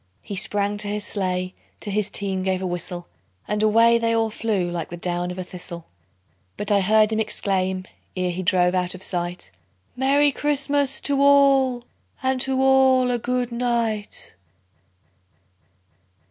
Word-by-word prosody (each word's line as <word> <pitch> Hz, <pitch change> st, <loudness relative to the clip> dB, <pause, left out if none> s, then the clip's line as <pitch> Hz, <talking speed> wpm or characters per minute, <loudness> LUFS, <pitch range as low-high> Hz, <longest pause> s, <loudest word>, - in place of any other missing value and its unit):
He 200 Hz, -, -6 dB
sprang 205 Hz, +1 st, -1 dB
to 205 Hz, 0 st, -2 dB
his 205 Hz, 0 st, -3 dB
sleigh, 185 Hz, -2 st, -2 dB, 0.3 s
to 205 Hz, -, -5 dB
his 210 Hz, 0 st, 0 dB
team 195 Hz, -2 st, -2 dB
gave 190 Hz, 0 st, 0 dB
a 190 Hz, -, -4 dB
whistle, 175 Hz, 0 st, -4 dB, 0.4 s
And 210 Hz, 0 st, -1 dB
away 230 Hz, +2 st, +4 dB
they 230 Hz, 0 st, +1 dB
all 225 Hz, -1 st, +1 dB
flew 210 Hz, -5 st, -1 dB
like 170 Hz, -2 st, -4 dB
the 175 Hz, -, -7 dB
down 175 Hz, 0 st, -2 dB
of 180 Hz, -, -6 dB
a 185 Hz, -, -3 dB
thistle; 175 Hz, -2 st, -9 dB, 0.7 s
But 205 Hz, -, -3 dB
I 200 Hz, -1 st, +4 dB
heard 215 Hz, +2 st, +3 dB
him 220 Hz, -, 0 dB
exclaim, 190 Hz, -3 st, -1 dB, 0.3 s
ere 180 Hz, -1 st, 0 dB
he 180 Hz, +2 st, -4 dB
drove 180 Hz, 0 st, +3 dB
out 180 Hz, 0 st, 0 dB
of 185 Hz, -, -5 dB
sight, 175 Hz, -, -3 dB, 0.4 s
"Merry 280 Hz, +3 st, +3 dB
Christmas 285 Hz, -1 st, +1 dB
to 280 Hz, -1 st, +1 dB
all, 275 Hz, -3 st, +4 dB, 0.4 s
and 260 Hz, -1 st, 0 dB
to 265 Hz, 0 st, 0 dB
all 265 Hz, -1 st, +4 dB
a 240 Hz, -, 0 dB
good 250 Hz, +1 st, -2 dB
night!" 235 Hz, -3 st, -2 dB
210 Hz, 160 wpm, -23 LUFS, 185-250 Hz, 0.7 s, away